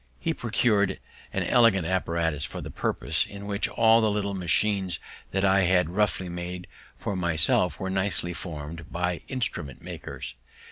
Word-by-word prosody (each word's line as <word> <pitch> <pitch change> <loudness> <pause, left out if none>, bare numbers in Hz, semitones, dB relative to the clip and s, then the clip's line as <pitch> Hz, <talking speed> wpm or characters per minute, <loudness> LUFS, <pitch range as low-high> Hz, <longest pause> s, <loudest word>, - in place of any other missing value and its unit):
He - - 0
procur'd 110 -4 +1 0.3
an - - -1
elegant 115 -8 +4
apparatus 85 -4 0
for - - -4
the - - -7
purpose, - - 0
in 100 0 -9
which 100 0 0
all 115 0 +5
the 110 - +3
little 100 -1 -1
machines 95 0 +1 0.3
that 95 +1 +1
I 95 0 +5
had 90 -2 +3
roughly 95 -1 +1
made 90 +1 -5 0.3
for 100 - -3
myself 85 -1 +2
were 95 0 -2
nicely 95 -2 -1
form'd 80 -1 -7
by 90 0 -1
instrument 90 - -2
makers. - - -6
95 Hz, 150 wpm, -27 LUFS, 85-100 Hz, 0.3 s, all